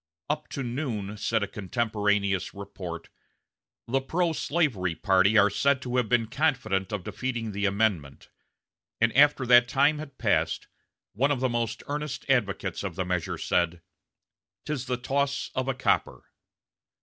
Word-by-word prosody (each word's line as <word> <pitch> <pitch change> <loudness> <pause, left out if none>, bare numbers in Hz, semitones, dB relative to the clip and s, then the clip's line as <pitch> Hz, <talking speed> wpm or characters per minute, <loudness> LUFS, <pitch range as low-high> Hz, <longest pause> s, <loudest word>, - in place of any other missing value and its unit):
"Up 150 0 -3
to 140 - -4
noon," 120 -5 -3
said 110 0 0
a - - -2
contemporaneous 105 -2 -1
report, 90 -4 -7 0.8
"the 135 +3 +1
pro 165 +4 0
slavery 130 - 0
party 95 +4 +3
are 100 -1 +5
said 140 +5 +2
to 125 0 -2
have 120 -4 +1
been 120 -2 +3
confident 115 -7 0
of 105 -4 -3
defeating 120 -2 -3
the 100 0 0
amendment; 95 -9 -1 0.7
and 115 0 +2
after 145 -1 +5
that 120 0 +6
time 145 +3 +3
had 140 -3 -9
passed, 85 -8 0 0.5
one 135 +7 +2
of 145 -3 +1
the 130 - +2
most 115 -2 -2
earnest 150 -1 -4
advocates 100 -7 0
of 95 -4 -4
the 95 - -2
measure 90 -2 -2
said: 85 -1 0 0.8
"'Tis 135 -4 -3
the 125 0 -1
toss 140 +2 -1
of 130 0 -2
a 135 - 0
copper." 130 - 0
115 Hz, 150 wpm, -27 LUFS, 100-135 Hz, 0.8 s, that